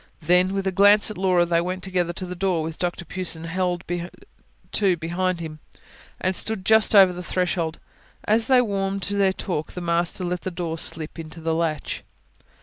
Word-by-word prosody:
Then, 180 +4 +3
with 195 0 -2
a 190 - +1
glance 205 +3 +5
at - - -8
Laura, 180 -2 +3
they 170 -1 +2
went 180 +1 -4
together 180 -2 0
to 185 - -4
the 180 0 -6
door, 180 -3 0
which 160 0 -6
Dr 175 -1 -3
Pughson 175 -1 -2
held 180 +1 -1 0.9
to 190 -4 +2
behind 175 +2 -1
him, 155 -2 -7 0.6
and 185 0 0
stood 190 0 -2
just 220 0 +5
over 190 -2 +7
the 180 - -6
threshold. 175 -2 -1 0.5
As 220 +1 +2
they 255 -2 +5
warmed 195 -2 -2
to 200 - -2
their 195 -1 +3
talk, 175 -5 -4
the - - -5
master 170 +2 0
let 175 0 -2
the - - -3
door 170 -2 -4
slip 160 0 -2
into 160 +1 -8
the 165 0 -1
latch. 160 -2 -2
180 Hz, 190 wpm, -23 LUFS, 170-190 Hz, 0.9 s, over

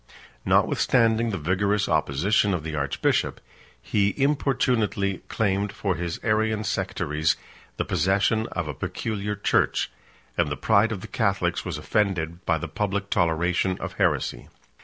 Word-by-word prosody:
Notwithstanding 115 -1 +3
the 100 - -2
vigorous 100 +5 +1
opposition 85 +6 +2
of 80 - -4
the 80 0 -5
archbishop, 70 -2 0 0.4
he 100 - 0
importunately 125 -8 +1
claimed 100 -1 0
for 100 -2 -1
his 85 -1 -4
Arian 110 0 +1
sectaries 75 -6 0 0.4
the - - -1
possession 95 +6 +1
of 85 -3 -4
a 75 - -3
peculiar 105 +8 -3
church; 105 - +1 0.5
and - - +2
the 70 - -3
pride 110 0 +3
of 100 -4 -4
the - - -8
Catholics - - 0
was - - -4
offended 90 -5 -1
by 80 - +3
the 85 - -5
public 100 +4 -2
toleration 85 +2 +1
of - - -5
heresy. - - 0
100 Hz, 135 wpm, -25 LUFS, 85-110 Hz, 0.5 s, Notwithstanding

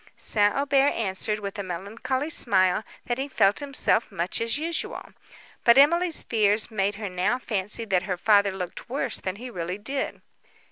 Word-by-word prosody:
St. 205 -1 +4
Aubert 280 0 +2
answered, 210 0 -1
with 200 0 -6
a - - -1
melancholy 210 - -4
smile, 190 - +3 0.2
that 240 +1 -2
he 270 - -2
felt 205 -7 +2
himself 275 -6 0
much 180 +1 -2
as 230 +3 0
usual; 325 +2 -3 0.5
but 235 +1 +6
Emily's 340 +4 +4
fears 215 -1 +1
made 200 -1 -1
her 210 0 -5
now 185 +6 0
fancy 210 -2 -2
that 190 -4 +1
her 180 - -1
father 200 +1 +3
looked 185 +2 -7
worse 270 +4 -2
than 185 0 -4
he 245 +4 -9
really 180 -2 -4
did. 270 +7 -4
210 Hz, 170 wpm, -25 LUFS, 195-260 Hz, 0.5 s, but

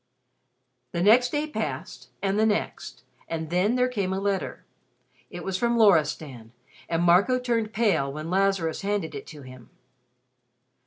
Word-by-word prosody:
The 170 - 0
next 240 +5 +5
day 295 0 0
passed, 310 - -5
and 195 +1 +1
the 220 - +4
next; 210 -1 -3 0.2
and 160 -1 -4
then 190 +7 +2
there 250 0 +2
came 200 -7 -2
a 190 - -1
letter. 195 -1 -3 0.6
It - - -8
was 190 -1 -2
from 235 0 +1
Loristan, 150 - +2 0.4
and 165 0 0
Marco 185 +9 +4
turned 235 -3 -1
pale 195 -11 +1
when 155 +4 -6
Lazarus 190 -4 +1
handed 200 -6 -2
it 140 - -8
to 150 -3 -11
him. 130 -2 -13
195 Hz, 150 wpm, -26 LUFS, 160-220 Hz, 0.6 s, next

